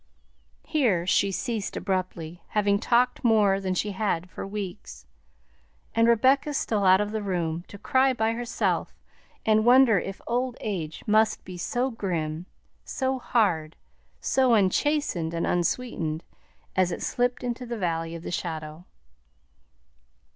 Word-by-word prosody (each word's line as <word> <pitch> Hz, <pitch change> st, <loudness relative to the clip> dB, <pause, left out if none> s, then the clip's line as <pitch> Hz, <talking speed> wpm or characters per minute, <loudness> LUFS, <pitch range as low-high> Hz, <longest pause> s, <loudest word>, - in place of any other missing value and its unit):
Here 220 Hz, -, +1 dB
she 195 Hz, +2 st, +2 dB
ceased 215 Hz, +2 st, -3 dB
abruptly, 180 Hz, -3 st, -3 dB
having 200 Hz, -1 st, +1 dB
talked 245 Hz, +3 st, +2 dB
more 210 Hz, -4 st, +4 dB
than 190 Hz, -1 st, -2 dB
she 205 Hz, +2 st, -1 dB
had 185 Hz, -3 st, -2 dB
for -, -, -6 dB
weeks; 195 Hz, -, -7 dB, 0.9 s
and 230 Hz, 0 st, +4 dB
Rebecca 270 Hz, +5 st, +3 dB
stole 220 Hz, -9 st, 0 dB
out 185 Hz, 0 st, +6 dB
of 210 Hz, 0 st, -1 dB
the 220 Hz, 0 st, -2 dB
room, 175 Hz, -4 st, -2 dB
to 205 Hz, -, -10 dB
cry 265 Hz, +6 st, +3 dB
by 225 Hz, -3 st, 0 dB
herself 235 Hz, +1 st, -1 dB, 0.5 s
and 215 Hz, -1 st, +4 dB
wonder 245 Hz, -3 st, +6 dB
if 195 Hz, +1 st, -6 dB
old 245 Hz, +1 st, -1 dB
age 165 Hz, -7 st, -4 dB
must 215 Hz, +1 st, +2 dB
be 185 Hz, -, -8 dB
so 245 Hz, +9 st, -1 dB
grim, 170 Hz, -6 st, -3 dB, 0.4 s
so 265 Hz, 0 st, -2 dB
hard, 180 Hz, -11 st, +1 dB, 0.4 s
so 260 Hz, -, +3 dB
unchastened 190 Hz, -, +1 dB
and 165 Hz, -, -1 dB
unsweetened, 175 Hz, -3 st, -1 dB, 0.5 s
as 185 Hz, -1 st, +2 dB
it -, -, -4 dB
slipped 245 Hz, +1 st, 0 dB
into 245 Hz, 0 st, -4 dB
the 235 Hz, 0 st, -4 dB
valley 165 Hz, -3 st, -2 dB
of 165 Hz, -, -8 dB
the -, -, -5 dB
shadow. 160 Hz, -1 st, -5 dB
205 Hz, 140 wpm, -26 LUFS, 175-240 Hz, 0.9 s, out